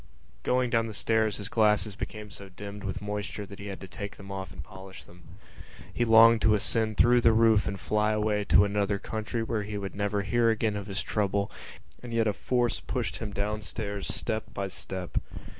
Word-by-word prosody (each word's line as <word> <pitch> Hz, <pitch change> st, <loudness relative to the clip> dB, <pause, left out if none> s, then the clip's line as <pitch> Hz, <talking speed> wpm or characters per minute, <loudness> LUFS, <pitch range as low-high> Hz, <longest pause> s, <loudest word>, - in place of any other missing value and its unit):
_ -, -, -23 dB, 0.4 s
Going 125 Hz, -, +1 dB
down 115 Hz, -1 st, +2 dB
the 110 Hz, -, -6 dB
stairs 110 Hz, 0 st, +1 dB
his 100 Hz, -, -5 dB
glasses 105 Hz, -2 st, +2 dB
became 105 Hz, -1 st, -6 dB
so 100 Hz, -2 st, -10 dB
dimmed 100 Hz, +2 st, -8 dB
with 100 Hz, 0 st, -4 dB
moisture 105 Hz, 0 st, -4 dB
that 100 Hz, 0 st, -11 dB
he 100 Hz, -, -7 dB
had 95 Hz, -1 st, -6 dB
to 95 Hz, -, -7 dB
take 100 Hz, +2 st, -6 dB
them 100 Hz, 0 st, -10 dB
off 95 Hz, -1 st, -5 dB
and -, -, -8 dB
polish 95 Hz, -1 st, -11 dB
them. 90 Hz, +1 st, -17 dB, 0.7 s
He 120 Hz, -, +1 dB
longed 115 Hz, 0 st, +7 dB
to 110 Hz, -1 st, +5 dB
ascend 110 Hz, +1 st, 0 dB
through 120 Hz, +1 st, +5 dB
the 115 Hz, -, +6 dB
roof 110 Hz, -2 st, +4 dB
and 100 Hz, -, -3 dB
fly 105 Hz, +2 st, +1 dB
away 105 Hz, -1 st, +1 dB
to 100 Hz, +1 st, +6 dB
another 100 Hz, 0 st, 0 dB
country 110 Hz, +3 st, -3 dB
where 115 Hz, -1 st, -1 dB
he 105 Hz, 0 st, -5 dB
would 100 Hz, -1 st, -5 dB
never 100 Hz, 0 st, -1 dB
hear 120 Hz, +2 st, +2 dB
again 110 Hz, -1 st, +1 dB
of 100 Hz, -1 st, -5 dB
his 100 Hz, -1 st, -2 dB
trouble, 100 Hz, -1 st, 0 dB, 0.5 s
and 120 Hz, -1 st, -6 dB
yet 115 Hz, -1 st, +3 dB
a 105 Hz, -, +2 dB
force 120 Hz, +2 st, 0 dB
pushed -, -, -3 dB
him 110 Hz, -2 st, -5 dB
downstairs 100 Hz, 0 st, -3 dB
step 110 Hz, -1 st, -3 dB
by 100 Hz, 0 st, -2 dB
step. 95 Hz, -1 st, -4 dB
105 Hz, 210 wpm, -28 LUFS, 100-110 Hz, 0.7 s, longed